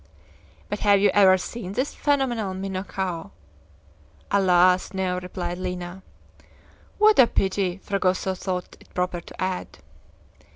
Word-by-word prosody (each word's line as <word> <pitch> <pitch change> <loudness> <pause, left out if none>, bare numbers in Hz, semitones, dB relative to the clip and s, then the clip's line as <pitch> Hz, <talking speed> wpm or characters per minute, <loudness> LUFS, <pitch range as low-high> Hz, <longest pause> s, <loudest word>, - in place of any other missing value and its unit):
"But 205 - -4
have 205 -1 +4
you 205 - +4
ever 190 -2 +6
seen 190 0 -6
this 255 +6 -1
phenomenal 245 -9 0
minhocao?" 190 -2 -4 1.0
"Alas, 185 -1 +3
no!" 185 -1 -1
replied 180 -1 -5
Lina. 180 0 -5 1.0
"What 425 -3 +5
a 250 - +8
pity!" 190 -3 0
Fragoso 190 -1 0
thought 185 -1 -5
it - - -21
proper 180 -1 -1
to - - -14
add. 185 -1 -3
190 Hz, 120 wpm, -24 LUFS, 180-200 Hz, 1.0 s, a